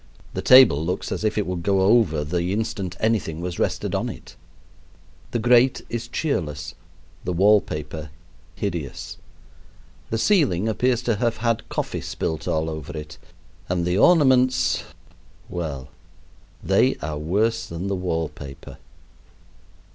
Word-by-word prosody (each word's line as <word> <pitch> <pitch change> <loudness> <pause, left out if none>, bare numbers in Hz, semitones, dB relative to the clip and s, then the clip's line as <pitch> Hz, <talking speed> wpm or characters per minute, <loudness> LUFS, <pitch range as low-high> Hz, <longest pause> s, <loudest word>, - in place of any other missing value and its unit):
The - - -3
table 125 - +7
looks 90 +3 -3
as - - -3
if 110 0 0
it 105 - +1
would 90 -1 -3
go 95 +2 +2
over 95 -7 +3
the 85 +4 -1
instant 100 -4 -3
anything 110 -8 0
was 90 0 -5
rested - - -1
on - - -1
it. - - -10 0.9
The - - -1
grate 120 +2 +4
is 115 0 -4
cheerless, 75 - -3 0.5
the - - -2
wall 100 +4 +5
paper 75 0 -6 0.5
hideous. 85 - -5 0.9
The 115 - -1
ceiling 115 - +2
appears 125 +2 +1
to 115 -3 0
have 115 +1 0
had 115 -1 -1
coffee - - -3
spilt 80 -1 -4
all 80 0 0
over 80 -1 -6
it, 75 0 -8 0.5
and 90 -1 0
the 90 +3 +1
ornaments 130 -6 +4 0.7
well, 70 -6 -5 0.7
they - - +3
are 75 0 -3
worse 110 +8 0
than 85 +2 -5
the 100 - -1
wallpaper. 80 -6 -5
95 Hz, 135 wpm, -23 LUFS, 80-115 Hz, 0.9 s, table